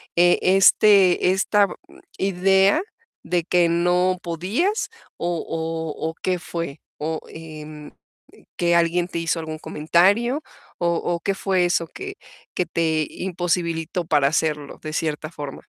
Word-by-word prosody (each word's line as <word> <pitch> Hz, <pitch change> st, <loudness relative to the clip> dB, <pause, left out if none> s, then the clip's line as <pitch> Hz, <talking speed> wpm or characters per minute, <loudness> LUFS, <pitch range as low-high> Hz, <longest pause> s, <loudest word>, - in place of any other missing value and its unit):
eh, 175 Hz, 0 st, +5 dB
este 190 Hz, -1 st, +5 dB
esta 200 Hz, +1 st, +3 dB
b -, -, -8 dB, 0.4 s
idea 195 Hz, -, +3 dB, 0.4 s
de 175 Hz, -1 st, 0 dB
que 175 Hz, 0 st, +3 dB
no 180 Hz, +2 st, +2 dB
podías 200 Hz, -, -1 dB, 0.3 s
o 175 Hz, -1 st, -2 dB
o 160 Hz, -1 st, -3 dB
o -, -, -6 dB
¿qué 185 Hz, -1 st, 0 dB
fue? 165 Hz, -4 st, -5 dB, 0.2 s
O, 160 Hz, +1 st, -3 dB
em, 155 Hz, -2 st, -10 dB, 0.7 s
que 175 Hz, -1 st, +2 dB
alguien 170 Hz, +1 st, +2 dB
te 170 Hz, -, -4 dB
hizo 165 Hz, 0 st, 0 dB
algún 160 Hz, -1 st, -6 dB
comentario 195 Hz, -, +2 dB, 0.4 s
o 175 Hz, -, +1 dB
o 170 Hz, +1 st, -1 dB
¿qué 195 Hz, +3 st, -1 dB
fue 190 Hz, -2 st, +1 dB
eso 175 Hz, -1 st, +1 dB
que 390 Hz, -, -8 dB, 0.4 s
que 180 Hz, -, 0 dB
te 160 Hz, -2 st, 0 dB
imposibilitó 175 Hz, -2 st, -2 dB
para 150 Hz, -4 st, +3 dB
hacerlo 150 Hz, -2 st, -2 dB
de 155 Hz, -, -6 dB
cierta 155 Hz, -1 st, -2 dB
forma? 145 Hz, -4 st, -8 dB
170 Hz, 135 wpm, -22 LUFS, 160-185 Hz, 0.7 s, eh